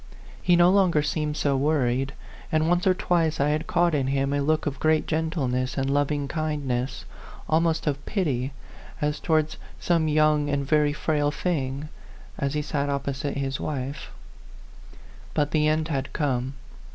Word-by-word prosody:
He 175 - +4
no 175 +1 +6
longer 185 -6 +3
seemed 150 0 -1
so 140 -2 +1
worried, 135 -2 +1 0.4
and 155 -1 +2
once 175 +2 +2
or - - +6
O - - +5
f - - -14
twice 165 -4 +1
I 140 +1 +3
had 155 +2 -1
caught 175 -1 +2
in 135 -3 +1
him 135 +1 0
a 145 - +1
look 155 +2 +1
of 140 -3 -3
great 155 0 +2
gentleness 145 -5 -1
and 135 0 0
loving 145 0 0
kindness, 140 -5 -2 0.4
almost 165 0 +1
of 140 -2 -1
pity, 140 - -1 0.5
as 150 -1 -1
towards 155 -1 +1 0.2
some 165 -2 +1
young 150 -1 +3
and 140 -1 0
very 150 0 +3
frail 145 -1 0
thing, 150 -3 -2 0.5
as 140 0 -1
he 150 - 0
sat 145 -1 -1
opposite 140 0 -2
his 135 -1 -2
wife. 140 -1 -4 1.3
But 145 0 +1
the 150 -2 +2
end 155 +1 +1
had 135 -2 -2
come. 135 -3 -1
150 Hz, 165 wpm, -25 LUFS, 140-155 Hz, 1.3 s, no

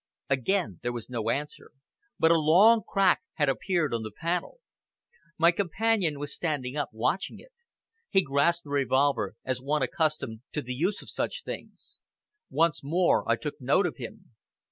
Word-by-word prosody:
Again 130 - 0
there 120 - -2
was 120 0 -7
no 115 -2 -2
answer, 145 +5 -3 0.5
but 160 - +4
a 165 - +5
long 195 +9 +6
crack 195 -1 +2
had 145 -2 +1
appeared 155 +1 0
on 115 - -1
the 110 - -5
panel. 170 - -3 0.8
My 170 +1 +6
companion 195 -2 0
was 145 0 -4
standing 145 -6 -2
up 145 -3 -1
watching 125 - -1
it. - - -17 0.6
He 190 - +3
grasped 145 +5 +2
the 145 - -11
revolver 135 -6 +1
as 130 -1 -2
one 145 +1 0
accustomed 145 -5 -1
to 150 - -2
the 125 - -4
use 180 +10 -1
of - - -9
such - - -3
things. - - -9 0.5
Once 165 -3 +1
more 170 +5 +2
I - - +5
took 150 -2 -6
note 140 +10 +3
of 175 - -3
him. 120 -2 -9
150 Hz, 165 wpm, -28 LUFS, 130-175 Hz, 0.8 s, long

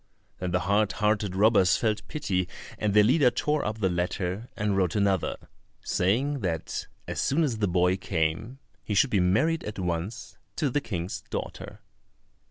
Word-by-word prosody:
Then 90 - -2
the 90 +1 +1
hard 100 0 +2
hearted 105 -2 0
robbers 95 -3 +4
felt 110 -2 -1
pity, 95 - -1 0.3
and 105 -1 0
their 105 - +7
leader 130 +4 +5
tore 150 +4 0
up 110 0 -2
the 95 - +3
letter 90 +4 -2
and 105 -2 0
wrote 95 -1 +1
another, 100 -3 +1 0.5
saying, 130 +10 +1
that 85 -7 -3 0.2
as - - -2
soon 155 +5 +2
as 125 -8 -1
the 105 - +2
boy 90 +1 +2
came, 85 +9 -2 0.3
he 105 - -2
should 125 +6 +4
be 100 - +3
married 110 - +2
at 105 0 -6
once 90 +5 -4 0.2
to 145 -5 0
the 145 - +1
King's 90 -7 -4
daughter. - - -6
100 Hz, 170 wpm, -27 LUFS, 90-115 Hz, 0.5 s, their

